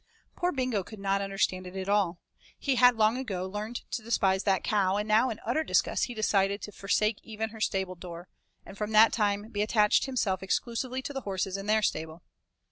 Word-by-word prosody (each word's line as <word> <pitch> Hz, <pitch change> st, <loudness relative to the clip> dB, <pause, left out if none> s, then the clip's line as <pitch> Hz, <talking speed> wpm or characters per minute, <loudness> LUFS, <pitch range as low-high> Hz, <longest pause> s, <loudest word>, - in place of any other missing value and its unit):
Poor 355 Hz, 0 st, 0 dB
Bingo 255 Hz, -, -1 dB
could 215 Hz, -, -11 dB
not 195 Hz, 0 st, 0 dB
understand 195 Hz, -2 st, -1 dB
it 180 Hz, -, -10 dB
at 190 Hz, 0 st, -4 dB
all. 200 Hz, -4 st, +2 dB, 0.4 s
He 275 Hz, -, 0 dB
had 250 Hz, 0 st, +6 dB
long 220 Hz, +3 st, +2 dB
ago 190 Hz, -8 st, -3 dB
learned 210 Hz, +5 st, -5 dB
to -, -, -2 dB
despise 195 Hz, -4 st, +1 dB
that 195 Hz, -3 st, +2 dB
cow, 200 Hz, -2 st, +1 dB
and 210 Hz, +1 st, -2 dB
now 220 Hz, +4 st, +4 dB
in 220 Hz, -, -5 dB
utter 250 Hz, +8 st, +1 dB
disgust -, -, +1 dB
he 245 Hz, -, -8 dB
decided 200 Hz, -2 st, +1 dB
to 210 Hz, -, -6 dB
forsake 210 Hz, +2 st, 0 dB
even 220 Hz, 0 st, -4 dB
her 220 Hz, 0 st, -11 dB
stable 190 Hz, -3 st, -1 dB
door, 175 Hz, 0 st, -9 dB, 0.4 s
and -, -, -11 dB
from 210 Hz, +1 st, -4 dB
that 220 Hz, +1 st, +7 dB
time 205 Hz, -1 st, 0 dB
be 205 Hz, -2 st, -2 dB
attached 210 Hz, +3 st, +3 dB
himself 210 Hz, -8 st, -1 dB
exclusively 245 Hz, +6 st, -2 dB
to 285 Hz, -, -5 dB
the 270 Hz, -, -4 dB
horses 190 Hz, -3 st, -2 dB
and 195 Hz, +1 st, -5 dB
their 215 Hz, 0 st, +3 dB
stable. 160 Hz, -1 st, -2 dB
210 Hz, 210 wpm, -29 LUFS, 195-225 Hz, 0.4 s, that